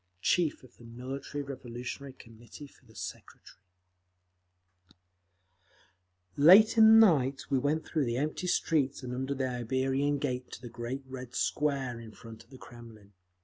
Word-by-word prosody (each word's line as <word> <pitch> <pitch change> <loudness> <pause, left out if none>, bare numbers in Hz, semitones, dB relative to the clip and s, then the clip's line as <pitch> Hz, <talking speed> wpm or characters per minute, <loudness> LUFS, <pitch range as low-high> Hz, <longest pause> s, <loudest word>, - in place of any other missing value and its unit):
Chief 170 -7 +1
of 130 - -18
the - - -16
Military 130 +5 -6
Revolutionary 130 0 -7
Committee 115 +3 -14
For 140 - -21
the 110 - -20
Secretary - - -10 2.8
Late 190 +10 +7
in 220 -1 +7
the 225 - +9
night 140 -7 +1
we 135 - +3
went 150 +4 -1
through 155 -4 -1
the 120 0 -2
empty 155 +6 -2
streets 140 -6 0
and 125 -1 -5
under 130 +2 -3
the 130 -1 -1
Iberian 130 +3 -1
Gate 125 -3 -3
to - - -9
the 120 - -7
great 120 +4 -6
Red 130 -2 -9
Square 135 -5 -1
in 110 -2 -11
front 110 -1 -13
of 115 - -31
the 130 - -13
Kremlin. 115 -5 -14
130 Hz, 150 wpm, -30 LUFS, 120-145 Hz, 2.8 s, the